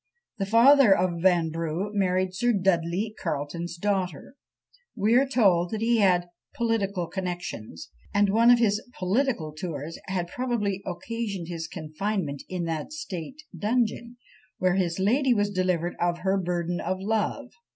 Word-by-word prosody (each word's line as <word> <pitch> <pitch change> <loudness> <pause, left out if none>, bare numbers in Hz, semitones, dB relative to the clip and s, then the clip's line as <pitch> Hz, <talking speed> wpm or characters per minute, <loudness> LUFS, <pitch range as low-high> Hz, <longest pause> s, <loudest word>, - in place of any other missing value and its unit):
The 195 - -1
father 235 0 +6
of 175 -2 0
Vanbrugh 165 +1 +1
married 185 -2 +1
Sir 240 +5 +1
Dudley 190 +1 0
Carleton's 165 +2 -3
daughter. 185 - -2 0.6
We 215 +1 +2
are 265 +3 +5
told 195 -7 +3
he 225 +2 +2
had 180 -3 +3 0.2
"political 205 -6 0
connexions;" 170 - -6 0.2
and 205 0 +3
one 230 +3 +5
of 245 - +8
his 215 -3 +2 0.2
"political" 185 - 0
tours 160 -1 -6
had 180 -2 -2
probably 210 -3 -2
occasioned 195 -1 -4
his 165 -2 -4
confinement 155 -2 -3
in 180 -2 -3
that 165 - -3
state 275 - -7
dungeon, 235 +2 -1 0.4
where 185 -1 +2
his 180 -3 0
lady 245 +7 +3
was 205 -1 +1
delivered 180 -2 0
of 175 0 0
her 190 +1 +1
burden 175 -2 -1
of 185 +2 -2
love. 220 +6 -1
190 Hz, 140 wpm, -26 LUFS, 175-220 Hz, 0.6 s, of